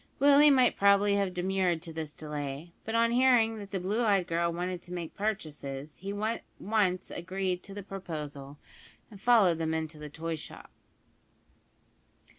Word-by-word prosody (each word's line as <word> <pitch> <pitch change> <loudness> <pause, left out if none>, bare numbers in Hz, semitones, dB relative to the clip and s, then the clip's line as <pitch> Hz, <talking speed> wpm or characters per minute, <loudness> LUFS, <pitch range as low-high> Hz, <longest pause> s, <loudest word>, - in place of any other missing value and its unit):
Willie 285 +2 +7
might 255 -3 +4
probably 200 0 +5
have 200 -2 +1
demurred 180 -2 0
to 165 -2 -7
this 155 -2 -5
delay; 150 +1 -6
but 225 - -3
on 230 0 +3
hearing 240 -3 +4
that 200 -1 -8
the 195 - -2
blue 200 +6 -1
eyed 200 -5 +3
girl 170 0 0
wanted 180 +1 -3
to 175 - -14
make 175 -3 -5
purchases, 150 -8 -4
he 195 - -7
at 215 +3 -2 0.2
once 195 -4 0
agreed 185 +1 -3
to 200 - -11
the 205 - -6
proposal, 150 -7 -7 0.5
and 200 -2 -13
followed 210 -9 +5
them 160 0 0
into 160 -1 -4
the 150 0 -7
toy 165 +2 -4
shop. 155 - -9
185 Hz, 165 wpm, -30 LUFS, 160-205 Hz, 0.5 s, Willie